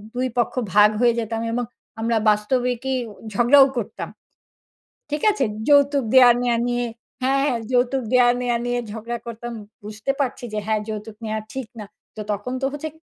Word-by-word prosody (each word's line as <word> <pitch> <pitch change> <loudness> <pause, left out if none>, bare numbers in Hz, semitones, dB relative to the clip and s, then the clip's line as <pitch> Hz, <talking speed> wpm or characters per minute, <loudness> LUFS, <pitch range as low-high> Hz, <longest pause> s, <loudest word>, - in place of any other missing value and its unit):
২ 255 +1 0
পক্ষ 240 - +1 0.2
ভাগ 210 0 +7
হয়ে 240 -1 +5
যেতাম 225 0 -3
এবং 245 +1 -1 0.4
আমরা 230 +1 +1
বাস্তবিকই 245 +4 0 0.4
ঝগড়াও 245 +6 +6
করতাম। 230 - -4 1.0
ঠিক 300 0 -2
আছে? 410 - -1 0.2
যৌতুক 285 -1 +4
দেয়া 255 -2 +8
নেয়া 240 -1 +1
নিয়ে 245 0 0 0.4
হ্যাঁ, 270 +1 +2
হ্যাঁ। 250 -5 0
যৌতুক 250 +1 +2
দেয়া 250 -1 +6
নেয়া 240 -1 +1
নিয়ে 245 0 0
ঝগড়া 230 +2 -5
করতাম। 235 +1 -6 0.3
বুঝতে 215 +5 -3
পারছি 265 -3 -2
যে, - - -2
হ্যাঁ, 220 0 +1
যৌতুক 215 0 -6
নেয়া 215 0 -2
ঠিক 265 -3 -5
না। 210 - -6 0.3
তো - - -9
তখন 210 +5 -3
তো - - +1
হচ্ছে 295 +2 -4
245 Hz, 165 wpm, -22 LUFS, 220-260 Hz, 1.0 s, দেয়া